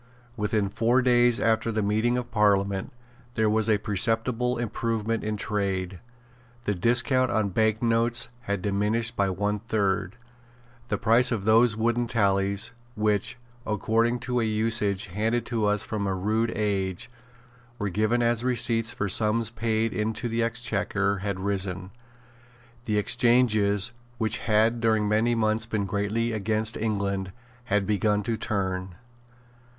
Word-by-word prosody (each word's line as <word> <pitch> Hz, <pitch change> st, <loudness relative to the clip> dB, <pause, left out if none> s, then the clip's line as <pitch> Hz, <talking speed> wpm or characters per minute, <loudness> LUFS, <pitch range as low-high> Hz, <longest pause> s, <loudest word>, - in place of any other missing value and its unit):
Within 105 Hz, -2 st, 0 dB
four 120 Hz, +6 st, +1 dB
days 120 Hz, -1 st, +3 dB
after 115 Hz, 0 st, +1 dB
the 110 Hz, -1 st, -1 dB
meeting 110 Hz, +4 st, +1 dB
of 125 Hz, -1 st, -5 dB
Parliament 100 Hz, -3 st, +1 dB, 0.4 s
there 110 Hz, -1 st, +2 dB
was 110 Hz, 0 st, +2 dB
a 105 Hz, -, +4 dB
perceptible 115 Hz, +4 st, 0 dB
improvement 115 Hz, -1 st, -2 dB
in 110 Hz, 0 st, -2 dB
trade. 95 Hz, -3 st, -2 dB, 0.6 s
The 105 Hz, -, 0 dB
discount 125 Hz, +6 st, +3 dB
on 110 Hz, -4 st, 0 dB
bank 110 Hz, +3 st, +1 dB
notes 115 Hz, 0 st, +1 dB, 0.2 s
had 100 Hz, -4 st, -2 dB
diminished 105 Hz, +4 st, 0 dB
by 100 Hz, -1 st, +1 dB
one 105 Hz, +2 st, -1 dB
third. 100 Hz, -3 st, -1 dB, 0.7 s
The -, -, -1 dB
price 115 Hz, +3 st, +4 dB
of 105 Hz, -5 st, -2 dB
those 110 Hz, 0 st, +4 dB
wooden 120 Hz, +1 st, 0 dB
tallies, 100 Hz, 0 st, 0 dB, 0.2 s
which, 105 Hz, +1 st, 0 dB, 0.3 s
according 115 Hz, +3 st, 0 dB
to 125 Hz, 0 st, -1 dB
an 115 Hz, -, 0 dB
usage 110 Hz, -2 st, 0 dB
handed 110 Hz, +6 st, -1 dB
to 115 Hz, -3 st, -1 dB
us 105 Hz, 0 st, +1 dB
from 105 Hz, -2 st, -3 dB
a 95 Hz, -, -1 dB
rude 110 Hz, +5 st, 0 dB
age, 100 Hz, 0 st, -2 dB, 0.7 s
were 105 Hz, -3 st, -2 dB
given 110 Hz, +5 st, +1 dB
as 120 Hz, 0 st, +1 dB
receipts 120 Hz, -2 st, +1 dB
for 105 Hz, -, -3 dB
sums 110 Hz, +3 st, +2 dB
paid 115 Hz, -1 st, -1 dB
into 110 Hz, +3 st, -2 dB
the 115 Hz, 0 st, -1 dB
Exchequer, 105 Hz, -4 st, -1 dB
had 100 Hz, -1 st, -3 dB
risen. 95 Hz, -1 st, -3 dB, 0.9 s
The 105 Hz, -3 st, 0 dB
exchanges, 110 Hz, -2 st, +2 dB, 0.3 s
which 110 Hz, 0 st, -1 dB
had 110 Hz, +1 st, +2 dB
during 110 Hz, -2 st, +2 dB
many 110 Hz, +3 st, +2 dB
months 110 Hz, 0 st, 0 dB
been 110 Hz, -3 st, -1 dB
greatly 105 Hz, +4 st, -1 dB
against 110 Hz, +1 st, 0 dB
England, 100 Hz, -3 st, -2 dB, 0.3 s
had 105 Hz, -5 st, +1 dB
begun 105 Hz, +1 st, +1 dB
to 115 Hz, +1 st, -1 dB
turn. 95 Hz, -4 st, -3 dB
110 Hz, 140 wpm, -26 LUFS, 100-115 Hz, 0.9 s, a